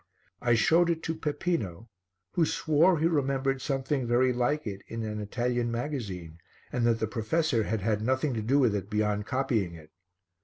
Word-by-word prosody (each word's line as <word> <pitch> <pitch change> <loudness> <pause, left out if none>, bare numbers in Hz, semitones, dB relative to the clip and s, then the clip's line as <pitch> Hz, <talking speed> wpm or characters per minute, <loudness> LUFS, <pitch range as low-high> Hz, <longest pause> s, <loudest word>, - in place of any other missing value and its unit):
I 120 -1 +3
showed 165 +9 +4
it 165 -1 -1
to 165 - -1
Peppino 145 - -2 0.4
who 170 - +2
swore 160 +3 +3
he 155 - +1
remembered 135 -4 +1
something 135 -1 -1
very 125 +2 +3
like 145 +5 0
it 100 -2 -5
in 115 0 -5
an 105 -1 -4
Italian 120 +3 -1
magazine 105 - -4 0.3
and 120 -1 +1
that 115 -1 +3
the 110 - +1
professor 115 +2 0
had 110 -1 -1
had 105 +1 0
nothing 130 +4 +1
to 110 - -2
do 125 +6 +2
with 125 -7 +4
it 100 0 -4
beyond 105 -1 0
copying 115 -9 0
it. 80 -1 -14
120 Hz, 180 wpm, -28 LUFS, 110-145 Hz, 0.4 s, showed